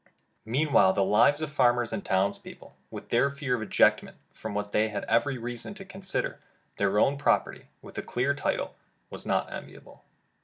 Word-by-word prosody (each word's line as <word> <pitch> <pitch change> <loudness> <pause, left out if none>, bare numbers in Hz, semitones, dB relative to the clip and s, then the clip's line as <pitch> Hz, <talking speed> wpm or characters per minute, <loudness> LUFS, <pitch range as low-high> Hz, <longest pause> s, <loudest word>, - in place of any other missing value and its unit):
Meanwhile 120 -6 +3
the 100 - +2
lives 140 +10 +4
of 150 - -4
farmers 120 -5 +2
and 190 - -3
town's 95 +2 +1
people, - - -13
with - - -9
their 120 +4 +3
fear 140 -2 -3
of 120 - -5
ejectment, 110 - +2
from 110 -2 -7
what 105 0 -3
they 110 +1 +2
had 105 - -4
every 120 +4 +1
reason 120 - -6
to 195 -1 -9
consider 190 0 -4 0.4
their 100 0 +1
own 140 +6 +3
property 145 - 0 0.2
with - - -8
a - - -2
clear 130 +4 0
title, 140 - -2 0.4
was - - -7
not - - 0
enviable. - - -11
120 Hz, 180 wpm, -28 LUFS, 105-145 Hz, 0.4 s, lives